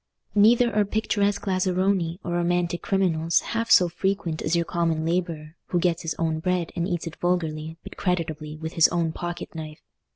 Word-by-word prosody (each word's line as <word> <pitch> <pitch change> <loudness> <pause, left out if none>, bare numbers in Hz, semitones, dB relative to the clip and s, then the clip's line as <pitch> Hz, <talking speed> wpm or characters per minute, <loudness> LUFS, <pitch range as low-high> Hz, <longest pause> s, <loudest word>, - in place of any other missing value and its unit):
Neither 230 +3 +5
are 210 - +4
picturesque 205 -1 0
lazzaroni 185 -2 +1
or 175 - -4
romantic 175 0 0
criminals 170 -4 +2
half 230 0 -3
so 180 - +7
frequent 175 -2 -2
as 155 - 0
your 170 0 +1
common 165 -2 0
labourer, 165 -2 -2
who 175 - 0
gets 175 -1 +1
his 165 -1 -3
own 160 -1 0
bread 180 0 -1
and 170 0 -1
eats 175 -3 -2
it 165 - -7
vulgarly 160 -3 -1
but - - -10
creditably 160 -4 -2
with 160 +1 -6
his 165 - +6
own 170 -2 0
pocket 175 +1 -6
knife. 155 -2 -8
175 Hz, 175 wpm, -25 LUFS, 160-185 Hz, -, so